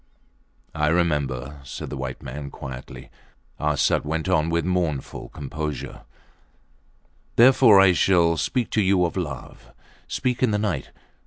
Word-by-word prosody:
I 75 0 0
remember, 75 -5 0
said 65 - -7
the - - -4
white 65 -1 -6
man, 70 +2 -6
quietly. 65 -2 -9 0.5
Arsat 75 -2 +1
went 80 +3 -3
on 80 -3 +2
with 85 0 0
mournful 90 -6 -2
composure 75 +1 -6 1.3
Therefore 120 -4 +7
I 95 -1 +7
shall 85 -2 +3
speak 120 +8 -1
to 110 - +2
you 95 -2 +3
of 85 - -3
love. 65 -8 -6 0.4
Speak 125 -1 -2
in 130 - +3
the 105 - +1
night. 100 -10 -2
80 Hz, 135 wpm, -24 LUFS, 70-95 Hz, 1.3 s, Therefore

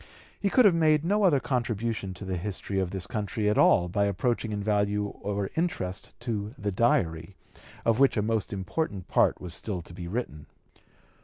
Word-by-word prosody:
He 200 - +1
could 250 +3 +5
have 200 - +7
made 155 -2 +3
no 205 +4 +2
other 170 -9 +4
contribution 115 -6 -2
to 100 - -8
the 95 -1 -2
history 95 +1 -3
of 95 -2 0
the 95 -1 -3
country 105 0 -2
at 105 - +2
all 90 0 +4
approaching 105 +3 0
in 105 -1 -3
value 105 0 +1
or 100 -1 -4
interest 160 - -3
to 110 -1 -3
the 100 0 -2
Diary, 95 -4 +1 0.5
of 115 +1 +3
which 135 -3 +4
a 105 - +2
most 110 -2 -1
important 100 - -3
part - - +3
was 90 -2 -5
still 90 -1 -2
to 85 - -12
be 85 0 -7
written. 85 - -4
105 Hz, 180 wpm, -28 LUFS, 95-120 Hz, 0.5 s, have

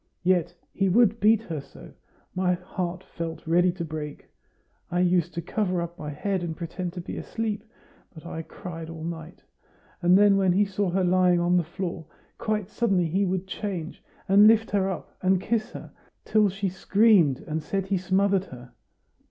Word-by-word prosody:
Yet 175 -1 +2 0.2
he 195 -1 +1
would 225 +2 +4
beat 220 +1 +4
her 160 -8 -5
so, - - -14 0.4
my 180 0 +1
heart 180 0 -5
felt 165 -1 -6
ready 175 +2 +3
to 170 -2 -5
break. 150 -2 -7 0.6
I 175 - -1
used 180 -1 +2
to 170 - -3
cover 185 -5 -1
up 170 0 -5
my 150 - -5
head 190 +6 -2
and 165 -2 -4
pretend 175 +1 -5
to 180 - -5
be - - -7
asleep, 220 -2 -3 0.5
but 160 -1 -13
I 165 -1 -5
cried 165 -1 -8
all 165 -1 -8
night. 165 0 -7 0.6
And 180 +1 +5
then, 200 -1 +5
when 190 -2 +3
he 205 +3 +3
saw 195 0 -1
her 185 +2 +1
lying 180 -1 +3
on 175 +1 +2
the 175 - +3
floor, 170 -1 -5 0.3
quite 210 -3 -1
suddenly 195 -6 +1
he 195 +5 +1
would 185 0 -1
change, 185 -3 -5 0.3
and 200 +2 +7
lift 225 0 +4
her 195 -1 +1
up 185 - -6
and 185 0 +3
kiss 215 +3 -1
her, - - -9 0.3
till 215 -2 +3
she 195 +1 -2
screamed 190 - +3
and 160 -1 -4
said 195 +4 -2
he 195 0 0
smothered 195 +1 +1
her. 125 -6 -12
180 Hz, 185 wpm, -26 LUFS, 170-195 Hz, 0.6 s, and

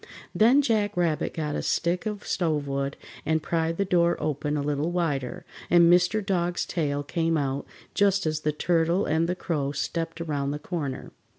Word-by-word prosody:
Then 250 +7 +5
Jack 210 -5 +1
Rabbit 165 -3 +1
got 150 -2 -2
a - - -2
stick 175 +5 0
of 210 -1 -5
stovewood 140 -5 -1 0.3
and 160 0 0
pried 165 0 -1
the 200 - +1
door 175 -2 +2
open 150 0 -1
a 145 - -1
little 145 +2 -1
wider, 155 -8 -2 0.2
and 170 0 +6
Mr. 180 +4 +2
Dog's 175 -2 0
tail 145 -4 -1
came 165 +2 0
out 140 -1 -2 0.3
just 195 -2 +2
as 155 -1 0
the 155 0 0
Turtle 170 +4 +1
and 160 +2 +1
the 180 - 0
Crow 150 -6 -2
stepped 165 +2 -3
around 145 -4 -2
the 145 - -2
corner. 145 -4 -5
165 Hz, 175 wpm, -26 LUFS, 150-180 Hz, 0.3 s, and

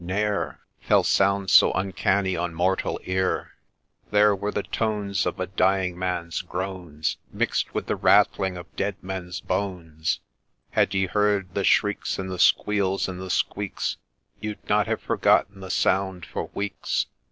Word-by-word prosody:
ne'er 100 +3 -1 0.2
Fell - - +3
sounds 100 -1 +2
so - - +8
uncanny 95 0 0
on 90 0 -2
mortal 95 +3 0
ear, 95 0 -1 0.6
There 105 0 +5
were 100 +2 -3
the 105 - -2
tones 105 -4 -1
of 90 - -3
a 90 - 0
dying 95 -1 +1
man's 90 -2 -2
groans 90 -4 -4
Mix'd - - 0
with - - -3
the - - -1
rattling 95 -1 +3
of 85 -1 -11
dead 100 - -1
men's 90 -2 -5
bones: 90 -5 -2 0.5
Had - - +2
you 95 -1 +1
heard 105 -3 +1
the 100 - -1
shrieks, 105 +1 +2
and 95 -1 -4
the 90 - -5
squeals, 100 0 +3
and 90 -1 -6
the 95 - -6
squeaks, 100 +2 -1 0.4
You'd 105 -1 -6
not - - +2
have - - -1
forgotten 100 +1 +2
the 95 -1 -8
sound 95 -2 +1
for - - -5
weeks. 100 -1 -1
95 Hz, 155 wpm, -25 LUFS, 90-100 Hz, 0.6 s, so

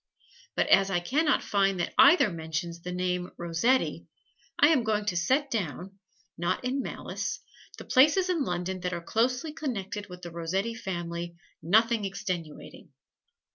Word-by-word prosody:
But - - +2
as 195 0 +5
I 185 -2 +1
can 275 - 0
not 300 - +2
find 195 -2 +1
that - - -2
either 320 - +6
mentions 165 +1 -4
the 180 - -6
name 180 0 -2
"Rossetti," 175 +10 0 0.5
I 295 -3 +6
am 290 -7 +3
going 215 -1 0
to 195 -4 -1
set 260 - +1
down 195 -1 -4 0.4
(not 175 +8 -1
in 265 +2 0
malice) - - -4 0.4
the - - -9
places 305 +8 +4
in 345 -5 +1
London 180 -2 -3
that 180 0 -3
are 170 - -4
closely 250 - 0
connected 210 -9 -4
with 180 0 -11
the 175 - -7
Rossetti 185 +7 -2
family, 175 -5 -5 0.3
nothing 220 +6 +3
extenuating. 185 -5 -6
195 Hz, 155 wpm, -28 LUFS, 175-250 Hz, 0.5 s, either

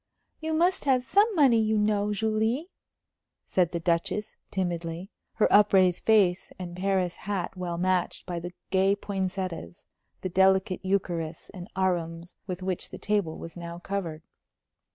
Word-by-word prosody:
"You 315 0 -2
must 350 +2 +2
have 260 -3 +3
some 405 - +4
money, 265 -8 +5
you 220 0 +1
know, 210 0 +1
Julie," 220 - 0 0.7
said 175 -2 +1
the 170 - -2
Duchess, 170 +5 -1
timidly, 175 0 -3 0.2
her 220 - +3
upraised 190 -3 +5
face 195 -5 +3
and 175 -1 -7
Paris 185 -1 0
hat 195 -2 -3
well 175 -2 -3
matched 185 0 0
by 175 -2 -3
the 175 +1 -7 0.2
gay 195 +1 +3
poinsettias, 190 -3 -4 0.4
the 185 - -2
delicate 190 +1 +3
eucharis 175 -4 -2
and 180 -1 -9
arums 175 -2 -1
with 185 -1 -4
which 185 -1 -2
the - - -8
table 205 -6 -1
was 165 - -9
now 170 -1 -7
covered. 175 -4 -4
190 Hz, 145 wpm, -27 LUFS, 175-210 Hz, 0.7 s, money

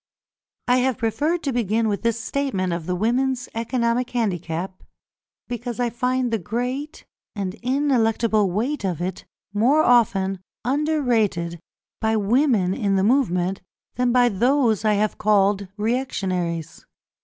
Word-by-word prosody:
I 250 +1 +4
have 255 0 +1
preferred 290 +9 0
to 275 - -1
begin 225 -1 +1
with 205 -2 -1
this 230 -1 0
statement 225 -8 -1
of 170 -1 -5
the 180 - 0
women's 250 +6 0
economic 235 +1 0
handicap, 185 -5 -3 0.7
because 240 0 -5
I 240 -1 0
find 250 0 0
the 225 - +1
great 250 - -4 0.3
and 195 -3 -3
ineluctable 230 -5 +2
weight 230 +9 -2
of 180 -5 -2
it 180 +1 -4 0.3
more 260 +9 +3
often 210 -6 +3 0.3
under 300 +4 +1
rated 185 -9 0 0.4
by 220 0 +1
women 215 -3 +2
in 200 -1 0
the 190 - +2
movement 195 -6 +1 0.3
than 245 0 +1
by 245 0 +5
those 240 0 +2
I 215 -1 +3
have 210 +1 0
called 200 -1 +2
reactionaries. 190 - -2
225 Hz, 135 wpm, -23 LUFS, 195-250 Hz, 0.7 s, by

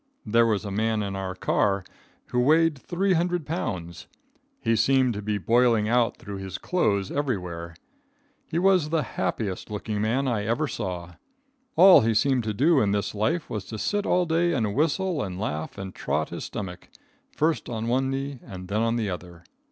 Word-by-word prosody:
There 115 +1 +4
was 105 -2 0
a 100 - -4
man 110 +1 0
in 100 -1 -4
our 95 -1 -4
car 100 +1 +1 0.5
who 125 - 0
weighed 155 +4 +4
300 175 +1 0
pounds. 95 - -4 0.5
He 115 0 +1
seemed 130 +2 +3
to 105 - -5
be 105 0 -1
boiling 115 +2 +3
out 120 0 +2
through 100 -4 -7
his 95 -1 -6
clothes 100 - 0
everywhere. 90 - -3 0.7
He 165 - -3
was 180 -4 +3
the 160 -1 +1
happiest 95 -2 -3
looking 105 0 -3
man 125 +6 +1
I 115 -5 0
ever 120 +7 0
saw. 90 -8 -5 0.6
All 185 -5 +9
he 115 -1 +1
seemed 130 0 +2
to 110 - 0
do 145 +4 +4
in 100 -1 +2
this 100 -2 -1
life 150 +11 0
was 105 -3 -4
to 110 - -7
sit 205 - -1
all 180 0 +3
day 170 +1 +1
and 110 -7 0
whistle 160 - +1
and 95 -4 -4
laugh 80 -6 -4
and 95 -1 -6
trot 75 +2 -2
his - - -6
stomach, 90 -4 -7 0.4
first 155 +1 0
on 115 -1 -3
one 130 +2 +1
knee 135 0 -3
and 90 -1 -9
then 105 +2 0
on 115 0 +1
the 115 -3 -1
other. 90 -1 -8
115 Hz, 185 wpm, -26 LUFS, 100-145 Hz, 0.7 s, All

